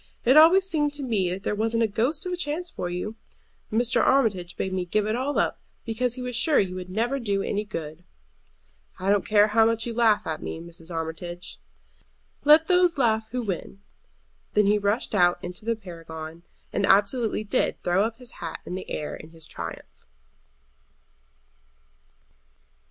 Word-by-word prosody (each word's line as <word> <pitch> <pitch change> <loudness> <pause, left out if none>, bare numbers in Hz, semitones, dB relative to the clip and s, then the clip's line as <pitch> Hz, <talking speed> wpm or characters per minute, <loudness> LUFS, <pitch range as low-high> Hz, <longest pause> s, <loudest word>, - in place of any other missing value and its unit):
It 255 +3 +5
always 335 +5 +7
seemed 300 -6 0
to 285 - -4
me 210 -8 +1
that 185 +2 -4
there - - -1
wasn't 225 +2 +1
a - - +3
ghost 255 - -1
of 365 - -2
a - - +1
chance 345 +1 -3
for 175 - -4
you. 195 +5 -4 0.5
Mr. 235 +3 +2
Armitage 210 -10 +2
bade 190 - -2
me 185 -1 -1
give 205 +4 0
it 215 +1 0
all 265 +4 -1
up, - - +1 0.3
because 235 +2 -1
he 255 - -6
was 250 -1 -3
sure 295 +5 +3
you 185 -2 +2
would 185 0 -6
never 235 +8 -1
do 200 -5 -1
any 205 +1 -1
good." 165 -5 -7 1.0
"I 190 +2 +1
don't 205 -1 +2
care 210 0 +5
how 225 +1 +4
much 225 0 +1
you 235 - -3
laugh 225 -2 +3
at 160 -1 -3
me, - - -5
Mrs. 170 0 -11
Armitage." 170 +1 -5 0.9
"Let 305 +2 +7
those 360 -3 +4
laugh 220 -4 +1
who 250 +1 -3
win." 195 0 -5 0.7
Then 210 0 +5
he 210 +1 +3
rushed 205 +4 0
out 175 -3 +4
into 180 +4 -6
the 230 0 +1
Paragon, 165 -4 -9 0.3
and 200 - +1
absolutely 215 +2 +3
did 200 - 0
throw 190 +5 +2
his 240 +2 -11
hat 165 -2 -7
up - - -29
in - - -6
the 185 - -6
air 150 - -4
in 155 - -11
his 165 -1 -10
triumph. - - -9
215 Hz, 180 wpm, -25 LUFS, 180-245 Hz, 1.0 s, always